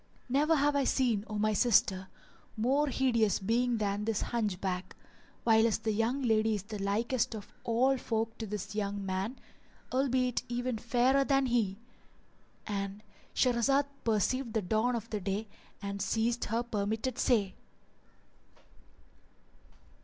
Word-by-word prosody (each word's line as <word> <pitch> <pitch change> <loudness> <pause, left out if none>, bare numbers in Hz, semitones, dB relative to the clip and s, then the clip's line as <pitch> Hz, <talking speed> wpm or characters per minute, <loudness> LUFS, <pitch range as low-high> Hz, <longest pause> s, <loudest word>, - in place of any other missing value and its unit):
Never 295 +5 +3
have 290 0 +2
I 280 - +3
seen, 245 -6 +1
O 215 - -4
my 215 +1 +2
sister, 195 -4 +3 0.5
more 270 +7 +2
hideous 235 -7 +2
being 235 +4 +1
than 205 -1 -1
this 225 -2 0
Hunchback 190 -5 -2
[FN#404] - - -29
whilst 225 -1 +4
the 220 - +1
young 230 +6 0
lady 220 -2 +2
is 200 - -4
the 210 0 -7
likest 225 +4 0
of 210 0 -9
all 255 +3 +2
folk 225 -1 -2
to 220 - -4
this 210 0 -5
young 200 -1 -2
man, 190 +7 -2 0.6
albeit 255 -2 +1
even 245 -1 -2
fairer 250 +4 +3
than 275 -1 +2
he,"—And 210 -2 -5 0.3
Shahrazad 260 +3 +3 0.2
perceived 230 +3 0
the 220 -3 0
dawn 220 +6 +1
of 230 -1 -4
day 205 +1 -2 0.4
and 200 0 -4
ceased 230 +3 0
saying - - -8
her 230 +1 +1
permitted 220 +3 -2
say. 210 -7 +2
225 Hz, 135 wpm, -31 LUFS, 205-250 Hz, 0.6 s, whilst